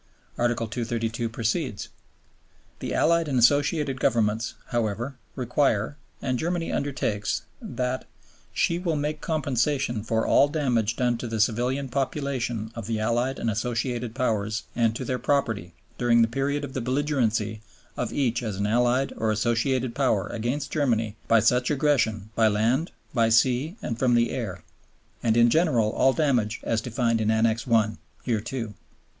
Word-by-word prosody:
Article 120 -1 0
232 115 0 -2
proceeds: 115 - -2 0.9
"The - - -4
Allied 170 0 +3
and 135 -3 0
Associated 145 +2 +3
Governments, 110 -1 +1
however, 120 +2 -2 0.2
require, 125 -1 +1 0.3
and 130 -2 0
Germany 170 0 -1
undertakes, 130 -8 -1 0.2
that 130 - -3 0.5
_she 170 +1 0
will 165 -4 0
make 150 +1 -2
compensation 135 -5 0
for 110 0 0
all 140 - +5
damage 125 -8 0
done 120 -1 0
to 120 - -4
the 115 -1 -3
civilian 125 +6 +1
population 130 -4 -2
of 115 -3 -7
the 115 -1 -1
Allied 120 +4 0
and - - -3
Associated 120 +1 -2
Powers 110 -4 -1
and 115 -2 +2
to 130 - -4
their 125 +1 -2
property_ 110 - 0 0.3
during 120 -1 +4
the - - +3
period 140 +4 -1
of 135 - -10
the 130 - -2
belligerency 115 -5 0 0.3
of - - -2
each 120 -4 0
as 110 -4 -3
an 100 +1 -1
Allied 120 +4 +2
or 110 - 0
Associated 120 +3 0
Power 125 -7 +1
against 125 +6 -3
Germany 115 -8 0
by 115 - +5
such 125 +3 +2
aggression 120 -8 +1
by 115 -1 +4
land, 115 - +1 0.2
by 115 -3 +3
sea, 125 - +3
and 115 -1 -3
from 125 -2 +3
the 120 0 +2
air, 95 -9 -4 0.6
and 115 -1 +2
in 120 0 +5
general 150 -10 +3
all 135 - +3
damage 125 -8 +1
as 115 -1 0
defined 115 -1 0
in 110 - +1
Annex 110 +1 +1
I. 110 -2 +3 0.3
hereto." 115 -1 -2
120 Hz, 150 wpm, -26 LUFS, 110-135 Hz, 0.9 s, all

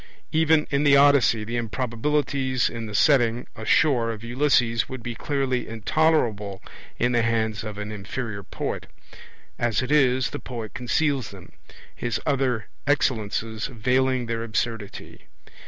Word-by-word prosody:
Even 160 -1 +3
in 140 0 +2
the 140 -1 +6
Odyssey 140 -6 +5
the 115 +3 -3
improbabilities 130 +3 -1
in 115 -1 -5
the 105 - -6
setting 120 -2 +3
ashore 115 +1 +2
of 110 0 -8
Ulysses 120 -2 +1
would 130 -2 -7
be 120 - -4
clearly 130 0 -1
intolerable 110 -4 0 0.4
in 120 +1 +1
the 120 -1 +3
hands 110 -2 0
of 105 -2 -6
an 105 +1 -5
inferior 105 +1 -5
poet. - - -5 0.7
As 120 0 +1
it 130 - -4
is, 130 -3 +3
the - - -5
poet 115 -4 -7
conceals 135 +1 0
them, 95 -3 -13 0.4
his 120 -3 -2
other 130 -6 0 0.2
excellences 110 -5 0
veiling 130 +1 +1
their 115 0 -3
absurdity. 115 -2 -4
120 Hz, 140 wpm, -24 LUFS, 110-135 Hz, 0.7 s, the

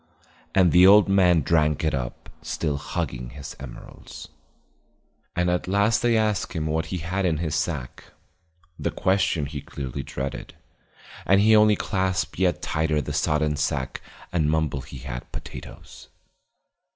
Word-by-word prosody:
And 90 -3 +5
the 90 +1 +7
old 105 +1 +7
man 90 -4 +4
drank 75 0 +1
it 80 - +1
up, 65 -3 -5
still 75 -3 -2
hugging 60 -3 -4
his 70 +3 -9
emeralds. 65 -2 -10 1.1
And 90 0 +1
at 90 0 0
last 100 +4 +2
they 120 -2 +3
asked 105 -4 0
him 80 -3 -2
what 80 +1 -1
he 90 - -3
had 90 +4 -2
in 85 -4 +1
his 80 -1 -2
sack, 75 -5 -3 0.7
the - - -1
question 95 -5 +1
he 70 0 -6
clearly 70 0 -6
dreaded; 70 0 -6 0.7
and 95 +1 +4
he 110 +2 +5
only 105 0 +6
clasped 95 -4 -1
yet 90 -2 +1
tighter 80 -1 0
the 70 - -4
sodden 75 0 +1
sack 75 -3 -2 0.3
and 80 -4 +2
mumbled 75 -4 -1
he 70 - -9
had 60 -1 -7
potatoes. - - -10
80 Hz, 150 wpm, -24 LUFS, 75-95 Hz, 1.1 s, the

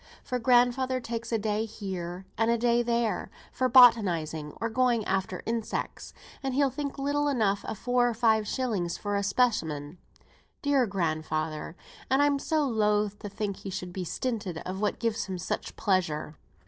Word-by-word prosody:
For 250 -2 -2
grandfather 250 +1 +3
takes 230 -1 -5
a 225 - +2
day 215 0 -1
here, 190 -4 -6
and 225 +1 +1
a 235 - +3
day 235 +1 +3
there, 235 -4 0 0.2
for 255 0 0
botanising 175 - +5
or 230 - 0
going 235 -2 +1
after 190 -1 -2
insects, 230 -1 -3 0.3
and 265 -2 -2
he'll 280 -1 +3
think 280 +2 -4
little 290 +1 0
enough 215 -8 +1
of 220 - -4
four 245 +2 +2
or 235 - -3
five 220 -2 +3
shillings 210 -11 -1
for 205 -1 -2
a 200 - +1
specimen; 180 - 0 0.6
dear 280 -4 +3
grandfather! 155 -4 -2 0.3
and 265 - +3
I'm 285 -1 +3
so 305 0 +1
loath 210 -3 +1
to 205 - -6
think 200 -1 -3
he 195 - -7
should 180 -1 -5
be 185 - -3
stinted 205 -1 -3
of 190 +2 -4
what 210 - 0
gives 230 -1 -1
him 190 -2 -4
such 175 - -4
pleasure. 160 -6 0
220 Hz, 170 wpm, -28 LUFS, 190-245 Hz, 0.6 s, botanising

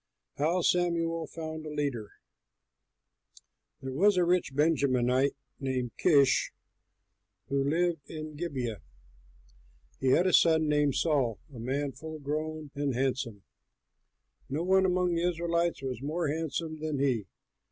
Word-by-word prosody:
HOW 165 +5 +1
SAMUEL 165 -2 +1
FOUND 160 0 -6
A 155 - -6
LEADER 140 -8 -2 1.7
There 135 - -4
was 195 +7 +4
a 180 - +4
rich 175 -6 +1
Benjamite 135 -3 +2 0.2
named 130 -3 -2
Kish, 140 -6 +4 1.0
who 140 0 +1
lived 170 -1 0
at 155 -1 -7
Gibeah. 130 - -3 1.2
He 135 - -1
had 150 +8 +4
a 185 - +2
son 160 -2 +5
named 150 -2 +2
Saul, 140 - +1 0.2
a 120 - -9
man 135 +4 -2
full 155 +4 -8
grown 155 +1 -4
and 140 -3 -1
handsome; 125 -5 -2 1.1
no 145 +5 -1
one 190 +1 +4
among 180 -1 +1
the 170 - 0
Israelites 170 -2 -1
was 130 -2 -4
more 155 +3 -1
handsome 155 +1 -3
than 155 -2 -2
he. 125 -7 0
150 Hz, 130 wpm, -29 LUFS, 135-165 Hz, 1.7 s, son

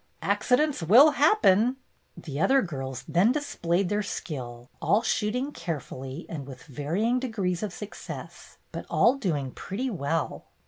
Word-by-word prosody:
"Huh! - - +1
Accidents 290 +1 +2
will 240 - +7
happen!" 265 - +4 0.4
The 145 -3 -6
other 270 +10 +4
girls 135 -7 -5
then 185 +7 +4
displayed 195 - 0
their 210 0 +1
skill, 125 -11 -6
all 215 +3 +3
shooting 240 +6 0
carefully 145 - -6
and 145 -5 -6
with 130 -2 -10
varying 170 - -1
de 260 - -3
grees 185 -6 -2
of 210 -3 -3
success, 210 +3 -9
but - - -7
all 235 - +4
doing 155 - -2
pretty 245 - -4
well. 160 -4 -2
185 Hz, 145 wpm, -27 LUFS, 145-245 Hz, 0.4 s, will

